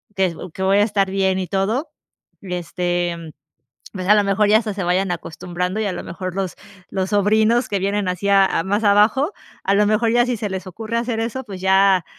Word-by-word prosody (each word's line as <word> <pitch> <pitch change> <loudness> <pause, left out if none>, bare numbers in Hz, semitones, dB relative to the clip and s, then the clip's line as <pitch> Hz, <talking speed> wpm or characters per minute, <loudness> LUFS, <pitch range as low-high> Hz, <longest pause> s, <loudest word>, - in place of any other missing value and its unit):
que 190 -3 +1 0.2
que - - -7
voy 195 +1 +3
a - - +5
estar 200 -2 +1
bien 190 -1 +1
y 185 - -3
todo, 215 - -1 0.5
este, 175 -1 -2
mm, 165 -1 -9 0.6
pues, 185 -2 -5
a 210 - +6
lo 210 - +3
mejor, 200 +1 +2
ya 215 - +6
hasta 220 -2 -2
se 195 -1 -4
vayan 180 +1 +1
acostumbrando 180 +3 -4
y, - - -1
a 200 - -1
lo - - -5
mejor, 185 +1 -6
los 190 -2 -3 0.3
los 190 -1 -2
sobrinos 215 +4 +3
que 200 - 0
vienen 200 +1 -1
así 180 +2 -2
a 195 -1 +6
a 165 - -1
más 205 +4 -1
abajo, 215 - +3 0.3
a 195 - +2
lo 210 +1 +4
mejor, 220 +2 +2
ya 240 +1 +4
si 250 -1 -1
se 210 -1 -3
les 190 -1 -5
ocurre 220 +5 -4
hacer 235 -1 -2
eso, 235 +3 -3
pues 195 -6 -9
ya 190 -1 +4
195 Hz, 220 wpm, -20 LUFS, 185-215 Hz, 0.6 s, a